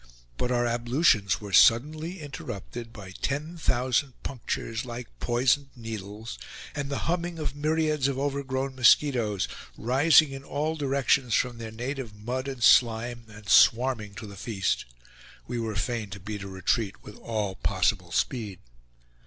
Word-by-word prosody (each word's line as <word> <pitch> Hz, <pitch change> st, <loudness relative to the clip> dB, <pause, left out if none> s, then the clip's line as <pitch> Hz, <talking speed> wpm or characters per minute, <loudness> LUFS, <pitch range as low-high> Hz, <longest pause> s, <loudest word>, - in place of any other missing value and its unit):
But 125 Hz, -, -1 dB
our 120 Hz, -1 st, +2 dB
ablutions 120 Hz, -, +2 dB
were 100 Hz, -2 st, -8 dB
suddenly 155 Hz, -, +4 dB
interrupted 120 Hz, -4 st, -7 dB
by 100 Hz, -5 st, -10 dB
ten 150 Hz, +5 st, -2 dB
thousand 130 Hz, -3 st, 0 dB
punctures, 115 Hz, -3 st, -3 dB
like 120 Hz, -1 st, -7 dB
poisoned 130 Hz, +3 st, +2 dB
needles, 110 Hz, -1 st, -7 dB, 0.3 s
and 145 Hz, -1 st, -3 dB
the 140 Hz, -, -3 dB
humming 175 Hz, 0 st, -1 dB
of 150 Hz, -3 st, -3 dB
myriads 155 Hz, -1 st, +1 dB
of 135 Hz, -1 st, -2 dB
over 140 Hz, 0 st, -1 dB
grown 130 Hz, 0 st, -2 dB
mosquitoes, 120 Hz, -5 st, +3 dB, 0.3 s
rising 140 Hz, +5 st, +5 dB
in 135 Hz, 0 st, -7 dB
all 150 Hz, +3 st, -2 dB
directions 135 Hz, -5 st, +1 dB
from 120 Hz, -2 st, 0 dB
their 115 Hz, -1 st, -6 dB
native 120 Hz, 0 st, -5 dB
mud 125 Hz, +6 st, -4 dB
and 130 Hz, -3 st, -4 dB
slime 120 Hz, +1 st, +4 dB
and 105 Hz, -1 st, -13 dB
swarming 115 Hz, -1 st, +4 dB
to 120 Hz, -, -7 dB
the 100 Hz, -1 st, -10 dB
feast. 95 Hz, -1 st, -1 dB, 0.6 s
We 120 Hz, 0 st, -3 dB
were 110 Hz, -2 st, -3 dB
fain 110 Hz, 0 st, -2 dB
to 100 Hz, +1 st, -8 dB
beat 105 Hz, +2 st, -6 dB
a 100 Hz, -, -6 dB
retreat 100 Hz, +2 st, -1 dB
with 105 Hz, -, -11 dB
all 105 Hz, -4 st, -2 dB
possible -, -, 0 dB
speed. 100 Hz, -, -1 dB
120 Hz, 150 wpm, -27 LUFS, 110-140 Hz, 0.6 s, rising